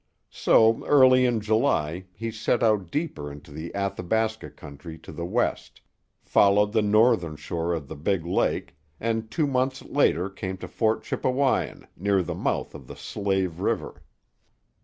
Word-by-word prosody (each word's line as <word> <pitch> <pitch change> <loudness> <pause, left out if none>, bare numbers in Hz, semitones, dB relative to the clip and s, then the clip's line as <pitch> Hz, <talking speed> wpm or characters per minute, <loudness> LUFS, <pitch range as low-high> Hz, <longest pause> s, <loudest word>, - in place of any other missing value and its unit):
So 115 0 +4
early 130 -3 +6
in 120 -3 0
July 105 - 0
he 115 +4 -4
set 110 +2 0
out 105 -6 +2
deeper 85 - -3
into 75 +1 -12
the 80 +3 -7
Athabasca 110 +3 -1
country 75 +3 -11
to 80 - -12
the 85 +2 -5
west, 120 +6 -2 0.4
followed 105 +1 +4
the 110 - +3
northern 105 -6 +3
shore 85 +2 -3
of 75 -4 -6
the - - -7
big 80 +3 -1
lake, 85 - -1 0.2
and 115 -1 -2
two 155 +4 0
months 130 -1 -1
later 95 - +1
came 95 -1 -6
to - - -8
Fort 110 -1 0
Chippewyan, 130 +1 0
near 95 0 +1
the - - -4
mouth - - -2
of 70 -4 -11
the - - -9
Slave 95 -4 -2
River. - - -2
100 Hz, 155 wpm, -25 LUFS, 85-115 Hz, 0.4 s, early